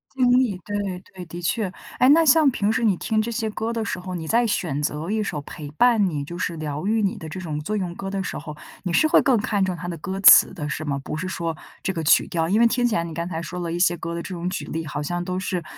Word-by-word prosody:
经 255 -2 +3
历， 225 -8 +1
对 205 0 -3
对 185 -2 -4 0.2
对， 180 -1 -7
的 170 +1 -8
确。 185 +4 -1 0.3
诶， 255 - +5
那 325 +3 +7
像 305 -1 +6
平 210 -3 0
时 225 - 0
你 210 -4 +3
听 215 +4 0
这 230 +2 -1
些 220 -1 -2
歌 225 +2 -3
的 225 - -2
时 200 - -3
候， 185 0 -6
你 165 -3 -5
在 235 +7 +3
选 170 -9 -1
择 150 +3 -2
一 215 0 0
首 155 -7 -3
陪 145 0 -9
伴 220 +4 +4
你 150 -5 -3
就 175 +4 -7
是 170 - -2
疗 150 +1 -4
愈 220 +2 +2
你 200 -2 0
的 160 - -8
这 175 +4 -6
种 155 -4 -4
作 210 +8 -3
用 180 -4 -3
歌 195 +1 -5
的 195 - -2
时 - - -4
候， 150 0 -8 0.3
你 180 -2 -2
是 310 - +4
会 - - +5
更 265 - +4
看 205 -2 0
重 185 -1 -2
它 175 +1 -7
的 170 - -4
歌 190 +4 -5
词 195 - +8
的 150 -5 -5
是 155 +2 -4
吗？ 140 -2 -1
不 155 - -4
是 185 - -3
说 165 -3 -3 0.2
这 190 - -1
个 165 - -3
曲 155 - +4
调。 165 -1 -1
因 200 +6 +2
为 235 - +6
听 245 +1 +1
起 235 -2 +1
来 170 - +1
你 170 - -6
刚 170 +1 -3
才 165 -2 -4
说 180 +1 -6
了 170 - -3
一 175 - -2
些 175 -1 +3
歌 170 +1 -5
的 170 - -3
这 185 - -6
种 170 +1 -4
举 - - -4
例， 165 0 -4
好 145 0 -4
像 175 +4 -2
都 185 0 -3
是 185 -2 -2
180 Hz, 325 characters per minute, -23 LUFS, 165-215 Hz, 0.3 s, 词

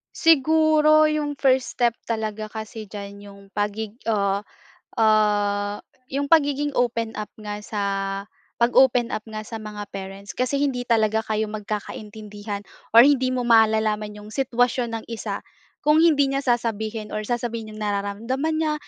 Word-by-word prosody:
Siguro, 310 0 +5
’yong 295 -1 -1
first 260 -2 +1
step 240 -1 +3 0.2
talaga 215 -1 -3
kasi 220 0 -7
diyan 200 0 -9
’yong 200 0 -13
pagig 210 +1 -2 0.2
ah, 200 -2 0 0.5
ah, 205 -2 +2 0.3
’yong 280 +1 -1
pagiging 290 -2 +2
open 230 -2 0
up 210 - -5
nga 210 -1 -6
sa 210 -1 -4 0.8
pag-open 245 0 +4
up 215 - -5
nga 215 -1 -7
sa 225 - -6
mga 210 -2 -7
parents, 195 +1 -8
kasi 255 +3 0
hindi 265 -4 0
talaga 220 -2 +2
kayo 215 0 -1
magkakaintindihan 210 0 -6 0.3
or 235 +4 +9
hindi 260 -3 +2
mo 250 -1 -1
malalaman 215 -2 +3
’yong 210 - -11
sitwasyon 245 -1 0
ng - - -14
isa 230 -1 -4 0.5
kung 310 +2 +6
hindi 285 -4 +4
niya 275 +1 -1
sasabihin 220 -3 -1
or 215 - -1
sasabihin 230 -1 -3
’yong 215 - -10
nararamdaman 215 +10 -2
niya, 310 -1 +1
220 Hz, 145 wpm, -23 LUFS, 210-260 Hz, 0.8 s, or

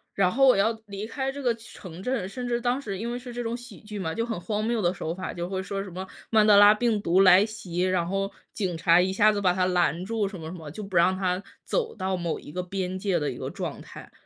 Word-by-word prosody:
然 185 -2 +3
后 270 +2 +4
我 255 - +6
要 210 +3 +3 0.2
离 200 +1 -5
开 265 +3 -3
这 280 0 -7
个 240 -2 +3
城 185 -6 -11
镇 245 -3 -1
甚 245 +5 -5
至 240 0 0
当 245 +3 0
时 200 -6 -5
因 235 +4 -3
为 245 - -3
是 250 0 -9
这 240 0 -4
种 230 +1 -2
喜 240 -4 -11
剧 210 -1 -7
嘛， 160 -3 -3
就 230 - -1
很 225 -6 -3
荒 215 +1 -2
谬 230 -1 0
的 175 -1 +2
手 165 -3 -4
法， 185 +1 -5
就 175 0 -4
会 190 0 -3
说 195 +1 -4
什 195 - -9
么 185 +2 -6 0.2
曼 215 -1 +5
德 205 - +7
拉 205 +1 +9
病 220 -1 +1
毒 185 0 +3
来 190 +1 +7
袭， 190 -5 -5
然 185 -2 +1
后 195 +2 -1 0.2
警 185 -5 -2
察 170 +1 +4
一 190 +1 +2
下 215 +2 +5
子 205 - -1
把 185 -3 +3
他 185 0 +1
拦 175 -2 +1
住 220 -1 -1
什 195 -2 -8
么 160 - -7
什 185 - -7
么， 155 -3 -9
就 210 - -7
不 195 -3 -3
让 185 +2 +4
他 185 0 -1 0.2
走 460 -2 -1
到 190 0 -1
某 170 -2 -2
一 - - -11
个 180 +3 -3
边 185 0 -3
界 190 -3 0
的 150 - -1
一 125 - -6
个 130 +1 -5
状 175 -5 -5
态。 - - -12
195 Hz, 305 characters per minute, -26 LUFS, 180-225 Hz, 0.2 s, 拉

